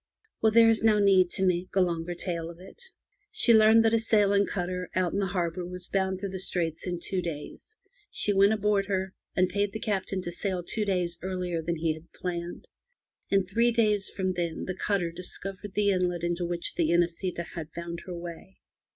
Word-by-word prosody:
Well, 220 Hz, -, +4 dB
there 230 Hz, +1 st, +7 dB
is 225 Hz, -, +1 dB
no 220 Hz, -1 st, +5 dB
need 195 Hz, -3 st, +5 dB
to 190 Hz, +1 st, +1 dB
make 180 Hz, 0 st, 0 dB
a -, -, +4 dB
longer 175 Hz, -1 st, -1 dB
tale 170 Hz, -2 st, -3 dB
of 170 Hz, 0 st, -11 dB
it. 190 Hz, -, -13 dB, 0.5 s
She 430 Hz, -, +4 dB
learned 220 Hz, +1 st, +6 dB
that 225 Hz, -, +3 dB
a 230 Hz, -, +4 dB
sailing 205 Hz, -3 st, +3 dB
cutter 180 Hz, -1 st, -3 dB
out 185 Hz, -2 st, +1 dB
in 200 Hz, -, 0 dB
the 195 Hz, -, 0 dB
harbour 180 Hz, -1 st, -2 dB
was 180 Hz, 0 st, -4 dB
bound 190 Hz, -1 st, 0 dB
through 200 Hz, 0 st, -4 dB
the 190 Hz, -, -5 dB
Straits 170 Hz, -2 st, -2 dB
in 175 Hz, -1 st, -2 dB
two 185 Hz, +1 st, -2 dB
days. 170 Hz, -, -7 dB, 0.3 s
She 205 Hz, -, +1 dB
went 200 Hz, +1 st, +5 dB
aboard 210 Hz, -2 st, +1 dB
her, 190 Hz, -1 st, -1 dB, 0.2 s
and 185 Hz, 0 st, +3 dB
paid 200 Hz, +2 st, -1 dB
the 220 Hz, -, -4 dB
Captain 195 Hz, -2 st, -2 dB
to 175 Hz, -, -4 dB
sail 185 Hz, 0 st, -2 dB
two 215 Hz, +4 st, -2 dB
days 175 Hz, -3 st, 0 dB
earlier 180 Hz, -2 st, -2 dB
than 170 Hz, +1 st, -2 dB
he 160 Hz, -1 st, 0 dB
had 160 Hz, +2 st, -14 dB
planned. 175 Hz, -1 st, -5 dB, 0.6 s
In 195 Hz, -1 st, +3 dB
three 230 Hz, +6 st, +2 dB
days 210 Hz, -4 st, +2 dB
from 185 Hz, -1 st, -2 dB
then 170 Hz, -2 st, -3 dB
the 185 Hz, -, -3 dB
cutter 185 Hz, -2 st, -1 dB
discovered 190 Hz, +3 st, -8 dB
the 205 Hz, -1 st, +3 dB
inlet 180 Hz, -2 st, 0 dB
into 175 Hz, 0 st, -1 dB
which 170 Hz, 0 st, -3 dB
the 165 Hz, -2 st, +1 dB
Inesita 170 Hz, +1 st, 0 dB
had 165 Hz, -2 st, -6 dB
found 170 Hz, 0 st, -5 dB
her 180 Hz, -, -5 dB
way. 170 Hz, +2 st, -9 dB
185 Hz, 205 wpm, -28 LUFS, 175-200 Hz, 0.6 s, there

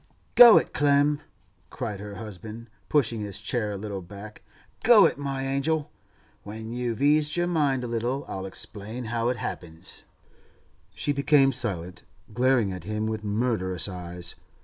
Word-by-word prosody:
'Go 240 Hz, -3 st, +10 dB
it, -, -, 0 dB
Clem!' 145 Hz, +1 st, +3 dB, 0.5 s
cried 100 Hz, -2 st, -5 dB
her 105 Hz, 0 st, -8 dB
husband, 110 Hz, +2 st, -9 dB, 0.2 s
pushing 115 Hz, -7 st, +2 dB
his 100 Hz, -2 st, -4 dB
chair 110 Hz, -4 st, -1 dB
a -, -, -4 dB
little 100 Hz, -1 st, -5 dB
back. 100 Hz, +4 st, -11 dB, 0.4 s
'Go 225 Hz, -3 st, +7 dB
it, -, -, 0 dB
my 135 Hz, -1 st, -3 dB
angel! 145 Hz, +3 st, -1 dB, 0.5 s
When 110 Hz, +2 st, -8 dB
you've 120 Hz, 0 st, -2 dB
eased 150 Hz, +2 st, +3 dB
your 175 Hz, -, +2 dB
mind 145 Hz, -7 st, +1 dB
a -, -, -3 dB
little, 120 Hz, +4 st, -2 dB
I'll 95 Hz, 0 st, -5 dB
explain 110 Hz, +5 st, -5 dB
how 115 Hz, 0 st, 0 dB
it 125 Hz, -, -1 dB
happens.' 80 Hz, -6 st, -7 dB, 0.9 s
She 90 Hz, +11 st, -1 dB
became 140 Hz, 0 st, +4 dB
silent, 95 Hz, -8 st, -2 dB, 0.3 s
glaring 120 Hz, -4 st, +2 dB
at 90 Hz, -3 st, -8 dB
him 105 Hz, +1 st, -2 dB
with 110 Hz, -1 st, -3 dB
murderous 105 Hz, -4 st, 0 dB
eyes. 90 Hz, -2 st, -5 dB
115 Hz, 150 wpm, -26 LUFS, 100-140 Hz, 0.9 s, Go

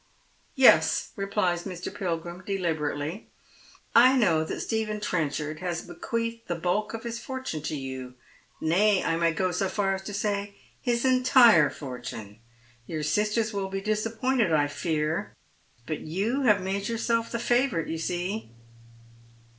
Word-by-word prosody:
" -, -, -37 dB
Yes," 165 Hz, -, +5 dB
replies 195 Hz, -3 st, -1 dB
Mr. 180 Hz, -2 st, -6 dB
Pilgrim, 175 Hz, -1 st, -4 dB
deliberately. 165 Hz, -2 st, -2 dB, 0.3 s
" -, -, -27 dB
I 265 Hz, -, +3 dB
know 170 Hz, -10 st, +3 dB
that 160 Hz, -, -4 dB
Stephen 220 Hz, -2 st, -2 dB
Trenchard 155 Hz, -5 st, -2 dB
has 175 Hz, -2 st, -3 dB
bequeathed 230 Hz, +6 st, -4 dB
the 175 Hz, -, -1 dB
bulk 200 Hz, +6 st, -1 dB
of 225 Hz, -, -7 dB
his 235 Hz, -1 st, -4 dB
fortune 260 Hz, -, -5 dB
to 155 Hz, +1 st, -3 dB
you; 130 Hz, -2 st, -6 dB, 0.4 s
nay, 190 Hz, +5 st, +3 dB
I 165 Hz, -, +1 dB
may 165 Hz, 0 st, +2 dB
go 185 Hz, +2 st, 0 dB
so 185 Hz, +2 st, -1 dB
far 195 Hz, -1 st, 0 dB
as 190 Hz, -, -4 dB
to 205 Hz, -, -5 dB
say 205 Hz, -1 st, -2 dB, 0.3 s
his 240 Hz, -1 st, 0 dB
entire 255 Hz, -2 st, +6 dB
fortune. 125 Hz, -6 st, -8 dB, 0.5 s
Your 155 Hz, -2 st, -3 dB
sisters 210 Hz, +7 st, +1 dB
will 195 Hz, -1 st, -2 dB
be 195 Hz, 0 st, -3 dB
disappointed, 220 Hz, +2 st, 0 dB
I 150 Hz, -2 st, +4 dB
fear, 155 Hz, +1 st, -2 dB, 0.5 s
but 155 Hz, -, -3 dB
you 205 Hz, -, -1 dB
have 205 Hz, -4 st, +4 dB
made 195 Hz, +1 st, -2 dB
yourself 230 Hz, 0 st, 0 dB
the 235 Hz, -, -1 dB
favourite, 240 Hz, -, +1 dB
you 160 Hz, -, -3 dB
see." 180 Hz, -, -3 dB
195 Hz, 150 wpm, -27 LUFS, 160-220 Hz, 0.5 s, entire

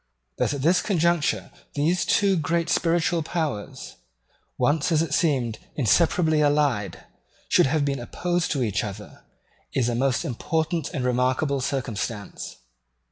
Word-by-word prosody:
That 145 Hz, -, +1 dB
at 135 Hz, -, -5 dB
this 175 Hz, +4 st, +4 dB
conjuncture 170 Hz, -5 st, +1 dB, 0.2 s
these 165 Hz, +5 st, +1 dB
two 200 Hz, -2 st, +3 dB
great 170 Hz, +1 st, 0 dB
spiritual 170 Hz, 0 st, +1 dB
powers, 155 Hz, -10 st, -4 dB, 0.6 s
once, 150 Hz, +3 st, +1 dB
as 160 Hz, 0 st, +3 dB
it 155 Hz, -3 st, -4 dB
seemed, 130 Hz, -9 st, +1 dB, 0.2 s
inseparably 155 Hz, -, +3 dB
allied, 145 Hz, -8 st, +1 dB, 0.5 s
should -, -, +5 dB
have 145 Hz, +1 st, +1 dB
been 140 Hz, -2 st, -1 dB
opposed 175 Hz, +8 st, -2 dB
to 135 Hz, -4 st, 0 dB
each 105 Hz, -2 st, -1 dB
other, 100 Hz, -3 st, -8 dB, 0.5 s
is 120 Hz, -3 st, +2 dB
a -, -, -1 dB
most 130 Hz, +1 st, 0 dB
important 160 Hz, +5 st, -1 dB
and 130 Hz, -4 st, -3 dB
remarkable 130 Hz, +3 st, +1 dB
circumstance. 115 Hz, -5 st, -4 dB
145 Hz, 135 wpm, -24 LUFS, 125-165 Hz, 0.6 s, should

